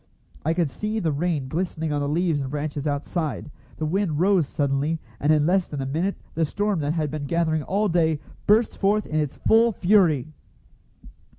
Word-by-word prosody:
I 160 Hz, +2 st, +1 dB
could 165 Hz, -5 st, 0 dB
see 215 Hz, +1 st, -3 dB
the 170 Hz, -7 st, 0 dB
rain 150 Hz, -2 st, -1 dB
glistening 160 Hz, 0 st, -2 dB
on 145 Hz, -, 0 dB
the 145 Hz, -, -1 dB
leaves 165 Hz, -1 st, +1 dB
and 135 Hz, -, -4 dB
branches 145 Hz, 0 st, -3 dB
outside. 150 Hz, +1 st, -3 dB, 0.3 s
The 155 Hz, -, -2 dB
wind 165 Hz, -2 st, 0 dB
rose 185 Hz, -4 st, +3 dB
suddenly, 145 Hz, +3 st, 0 dB, 0.2 s
and 150 Hz, -, +2 dB
in 150 Hz, -1 st, +3 dB
less 185 Hz, +2 st, +2 dB
than 145 Hz, -, -6 dB
a 135 Hz, -, -2 dB
minute 165 Hz, +9 st, -1 dB, 0.2 s
the 165 Hz, -, 0 dB
storm 205 Hz, +4 st, 0 dB
that 145 Hz, 0 st, -1 dB
had 155 Hz, -4 st, -1 dB
been 150 Hz, -2 st, -4 dB
gathering 160 Hz, 0 st, +1 dB
all 200 Hz, +7 st, 0 dB
day 160 Hz, -4 st, +2 dB, 0.3 s
burst 215 Hz, +3 st, +3 dB
forth 210 Hz, +2 st, +2 dB
in 155 Hz, -, -1 dB
its 150 Hz, -3 st, -2 dB
full 230 Hz, +1 st, +4 dB
fury. 175 Hz, -, +2 dB
160 Hz, 190 wpm, -24 LUFS, 145-185 Hz, 0.3 s, full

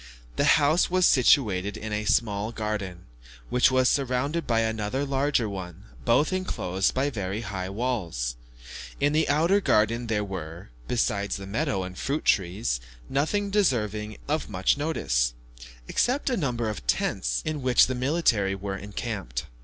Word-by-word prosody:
The -, -, +5 dB
house 155 Hz, +4 st, +3 dB
was 185 Hz, 0 st, +3 dB
situated 105 Hz, -, +3 dB
in 110 Hz, -1 st, -5 dB
a 105 Hz, 0 st, -2 dB
small 105 Hz, -1 st, +1 dB
garden, 105 Hz, -5 st, -4 dB, 0.5 s
which 125 Hz, -, +5 dB
was 130 Hz, -1 st, +3 dB
surrounded 140 Hz, +5 st, 0 dB
by 115 Hz, -1 st, +2 dB
another 110 Hz, +4 st, -1 dB
larger 135 Hz, -3 st, +1 dB
one, 95 Hz, -2 st, -7 dB, 0.2 s
both 145 Hz, +9 st, +3 dB
enclosed 95 Hz, -, -1 dB
by 140 Hz, +2 st, +1 dB
very 100 Hz, -2 st, -3 dB
high 95 Hz, -5 st, -4 dB
walls. 95 Hz, -, -2 dB, 0.6 s
In 145 Hz, +1 st, +2 dB
the 155 Hz, 0 st, +2 dB
outer 165 Hz, +8 st, +3 dB
garden 115 Hz, -, +2 dB
there 105 Hz, -2 st, 0 dB
were, 85 Hz, -7 st, -7 dB, 0.2 s
besides 100 Hz, -5 st, 0 dB
meadows 100 Hz, -1 st, -2 dB
and 90 Hz, 0 st, -8 dB
fruit 140 Hz, +9 st, -2 dB
trees, 90 Hz, -, +1 dB, 0.3 s
nothing 200 Hz, +9 st, 0 dB
deserving 110 Hz, -, 0 dB
of 155 Hz, -2 st, -1 dB
much 95 Hz, -2 st, +2 dB
notice, -, -, 0 dB, 0.5 s
except 265 Hz, +2 st, +1 dB
a -, -, +2 dB
number 120 Hz, -, -1 dB
of 90 Hz, -, -5 dB
tents, -, -, 0 dB
in 155 Hz, -2 st, -2 dB
which 125 Hz, -1 st, +5 dB
the 130 Hz, -, -2 dB
military 125 Hz, -7 st, +1 dB
were 100 Hz, 0 st, -4 dB
encamped. 100 Hz, -, -5 dB
110 Hz, 145 wpm, -26 LUFS, 95-140 Hz, 0.6 s, The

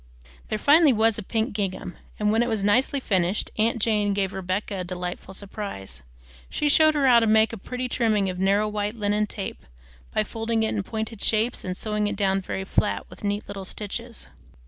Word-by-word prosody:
There 215 Hz, -, -1 dB
finally 290 Hz, +4 st, +6 dB
was 220 Hz, 0 st, +2 dB
a -, -, -3 dB
pink 220 Hz, +2 st, -1 dB
gingham, 190 Hz, -3 st, -3 dB, 0.2 s
and 210 Hz, 0 st, +2 dB
when 225 Hz, +2 st, +3 dB
it 240 Hz, -, +1 dB
was 220 Hz, -3 st, -1 dB
nicely 250 Hz, +7 st, +3 dB
finished, 190 Hz, -5 st, 0 dB
aunt 230 Hz, +2 st, +2 dB
Jane 210 Hz, -2 st, +2 dB
gave 195 Hz, -1 st, 0 dB
Rebecca 190 Hz, +2 st, -3 dB
a -, -, -2 dB
delightful 180 Hz, +1 st, -5 dB
surprise. 190 Hz, -, -6 dB, 0.5 s
She 295 Hz, -, 0 dB
showed 310 Hz, +1 st, +5 dB
her 285 Hz, -2 st, +2 dB
how 240 Hz, -2 st, +7 dB
to 225 Hz, -, +1 dB
make 220 Hz, +1 st, +4 dB
a -, -, -2 dB
pretty 250 Hz, +5 st, -4 dB
trimming 220 Hz, -5 st, +1 dB
of 180 Hz, -1 st, -4 dB
narrow 200 Hz, +3 st, +3 dB
white 210 Hz, +1 st, -2 dB
linen 210 Hz, -1 st, 0 dB
tape, 200 Hz, -2 st, -6 dB, 0.5 s
by 215 Hz, -, +1 dB
folding 225 Hz, +1 st, -1 dB
it 220 Hz, -, +1 dB
in 210 Hz, -, 0 dB
pointed 220 Hz, +1 st, -5 dB
shapes 225 Hz, +3 st, +1 dB
and 185 Hz, 0 st, -4 dB
sewing 210 Hz, -1 st, -1 dB
it 205 Hz, -, -2 dB
down 195 Hz, -1 st, +1 dB
very 190 Hz, +1 st, -4 dB
flat 100 Hz, -, 0 dB
with -, -, -13 dB
neat 205 Hz, +1 st, -2 dB
little 200 Hz, -1 st, -6 dB
stitches. 225 Hz, +4 st, -5 dB
210 Hz, 200 wpm, -25 LUFS, 195-225 Hz, 0.5 s, how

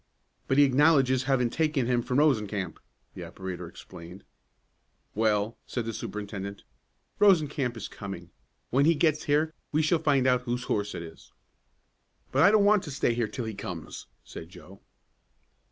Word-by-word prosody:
"But 135 Hz, -, +1 dB
he 145 Hz, -, +8 dB
acknowledges 135 Hz, -2 st, +3 dB
having 125 Hz, -3 st, +1 dB
taken 155 Hz, -4 st, 0 dB
him 120 Hz, 0 st, +1 dB
from 125 Hz, +2 st, -2 dB
Rosencamp," 105 Hz, -, +1 dB, 0.3 s
the -, -, -8 dB
operator 95 Hz, -2 st, -7 dB
explained. 85 Hz, +3 st, -12 dB, 0.9 s
"Well," 110 Hz, +1 st, 0 dB
said 120 Hz, -3 st, -3 dB
the 115 Hz, -, -4 dB
superintendent, 100 Hz, -1 st, -6 dB, 0.6 s
"Rosencamp 150 Hz, -, +3 dB
is 110 Hz, -, -5 dB
coming. 90 Hz, -4 st, -8 dB, 0.4 s
When 140 Hz, +3 st, +3 dB
he 165 Hz, +1 st, +4 dB
gets 155 Hz, 0 st, +1 dB
here 155 Hz, +2 st, +1 dB, 0.2 s
we 155 Hz, +1 st, +2 dB
shall 160 Hz, +2 st, +2 dB
find 140 Hz, -4 st, +2 dB
out 125 Hz, -1 st, +3 dB
whose 125 Hz, 0 st, -3 dB
horse 105 Hz, -4 st, -2 dB
it 85 Hz, -, -5 dB
is." 80 Hz, -1 st, -13 dB, 1.0 s
"But 135 Hz, -, +2 dB
I 180 Hz, -, +7 dB
don't 210 Hz, -1 st, +4 dB
want 210 Hz, -1 st, +5 dB
to -, -, -7 dB
stay 135 Hz, -3 st, 0 dB
here 115 Hz, -1 st, -1 dB
till 115 Hz, +3 st, -5 dB
he 110 Hz, -, -4 dB
comes," 90 Hz, -5 st, -7 dB, 0.2 s
said 80 Hz, -, -10 dB
Joe. 90 Hz, +2 st, -14 dB
125 Hz, 160 wpm, -27 LUFS, 100-145 Hz, 1.0 s, he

